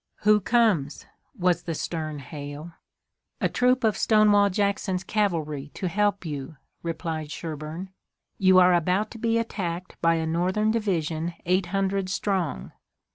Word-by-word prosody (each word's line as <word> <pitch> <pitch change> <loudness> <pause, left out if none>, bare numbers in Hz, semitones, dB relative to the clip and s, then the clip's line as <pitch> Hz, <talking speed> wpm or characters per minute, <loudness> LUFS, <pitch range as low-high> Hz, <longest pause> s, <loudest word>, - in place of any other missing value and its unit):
"Who 210 0 +5
comes?" 200 - +1 0.3
was 180 -1 +2
the 165 - -4
stern 155 -1 -4
hail. 145 +2 -8 0.7
"A - - +2
troop 250 0 +2
of 220 -2 +3
Stonewall 210 -2 +4
Jackson's 195 -1 -1
cavalry 160 -10 -1
to 185 - -2
help 205 +1 0
you," 145 -1 -6 0.2
replied 160 -2 -4
Sherburne. 160 +4 -6 0.5
"You 185 -1 +5
are 180 0 +7
about 180 +5 +1
to 230 - -9
be 230 0 +1
attacked 180 -6 -4
by 165 0 +4
a 160 -1 -1
Northern 185 +6 +1
division 170 -6 -1
eight 185 +1 +1
hundred 195 0 -1
strong." 175 - -2
180 Hz, 135 wpm, -26 LUFS, 160-205 Hz, 0.7 s, are